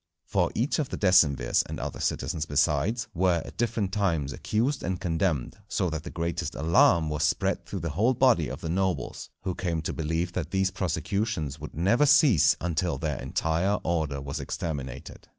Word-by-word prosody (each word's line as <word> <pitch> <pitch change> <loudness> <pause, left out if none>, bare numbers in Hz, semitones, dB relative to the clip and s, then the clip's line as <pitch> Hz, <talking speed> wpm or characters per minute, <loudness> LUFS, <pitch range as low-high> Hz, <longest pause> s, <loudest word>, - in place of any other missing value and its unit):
For 90 -1 +1
each 125 +8 0
of 145 - -1
the - - -4
decemvirs, 75 -10 +4
and - - -6
other - - -5
citizens 75 +3 -2
besides, 85 - +1
were 90 -1 +2
at - - -10
different 110 -4 -1
times 85 -9 0
accused 125 +7 -1
and 90 -1 -2
condemned, 80 -6 -1
so 90 - -1
that 80 0 -3
the 85 - -8
greatest 85 -1 -3
alarm 80 +2 +4
was 75 0 -2
spread 95 +5 0
through 95 - -5
the 85 -1 -3
whole 110 - +2
body 120 - +4
of 65 - -7
the - - -4
nobles, 90 -6 -2
who 95 -1 -1
came 85 -3 -2
to - - -3
believe 80 +2 -2
that 85 -4 -3
these 95 0 +1
prosecutions 95 -4 -2
would - - -8
never 110 - +3
cease 140 - +5
until 85 0 -1
their 75 -3 -3
entire 85 +6 0
order 80 -5 -1
was 70 0 -5
exterminated. 70 -3 -5
85 Hz, 180 wpm, -27 LUFS, 80-100 Hz, -, cease